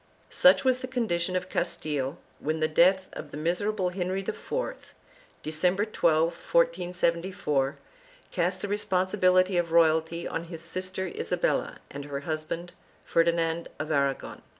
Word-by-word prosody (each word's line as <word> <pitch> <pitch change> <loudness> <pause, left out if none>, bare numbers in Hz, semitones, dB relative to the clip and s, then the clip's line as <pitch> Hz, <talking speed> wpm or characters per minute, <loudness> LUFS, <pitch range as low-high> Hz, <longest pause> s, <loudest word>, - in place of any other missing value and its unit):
Such 275 0 +5
was 255 -1 +3
the 255 - -5
condition 185 -8 -1
of 185 0 -1
Castile 145 -4 -2 0.2
when 155 +1 -2
the 155 - +2
death 185 +4 +4
of - - -7
the - - -8
miser 175 +6 0
able 190 -4 -1
Henry 185 +1 -2
IV, - - -5 0.5
December 180 +6 +1
12, 160 -7 +2
1474, 175 - 0 0.5
cast 180 +2 0
the - - -1
responsibility 185 -2 +2
of 170 -1 0
royalty 165 0 +3
on 170 - -3
his 165 -1 -8
sister 185 +2 -4
Isabella 465 - -1
and 140 0 -6
her 140 -1 -4
husband, 160 +3 -4 0.3
Ferdinand 165 0 +1
of 155 +1 -4
Aragon. 140 -2 -1
175 Hz, 135 wpm, -28 LUFS, 160-190 Hz, 0.5 s, Such